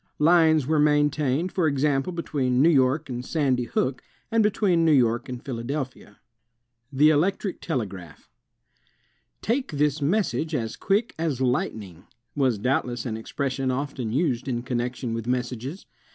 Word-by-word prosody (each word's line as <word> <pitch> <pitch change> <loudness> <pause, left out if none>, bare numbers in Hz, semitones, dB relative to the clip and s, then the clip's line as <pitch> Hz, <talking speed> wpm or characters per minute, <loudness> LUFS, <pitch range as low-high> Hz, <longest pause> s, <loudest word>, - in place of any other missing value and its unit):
Lines 160 -2 +4
were 155 +2 +1
maintained, 150 +2 +2
for 175 -4 +1
example, 140 +1 +1
between 135 -7 -1
New 160 +5 +6
York 135 +1 +2
and 125 -2 -5
Sandy 130 -4 0
Hook, 125 +3 -1 0.3
and 225 0 +3
between 200 -5 +2
New 160 - +4
York 120 -5 +2
and 125 -1 -7
Philadelphia. 130 -3 -5 0.7
The 150 +3 +5
Electric 185 +5 0
Tele 130 -9 -1
graph 90 -5 -12 1.2
"Take 250 - -1
this 150 +1 +1
message 165 -1 0
as 115 -4 -3
quick 210 +4 0
as 155 -6 -1
lightning," 110 -8 -2 0.3
was 130 -6 +2
doubtless 125 0 -1
an 115 -3 -3
expres 130 +4 -3
sion 135 -1 -2
often 130 -3 -3
used 130 -2 0
in 120 -2 -2
con 125 -1 -2
nection 125 -1 -3
with 115 0 -4
messages. 125 - -3
135 Hz, 150 wpm, -25 LUFS, 125-155 Hz, 1.2 s, New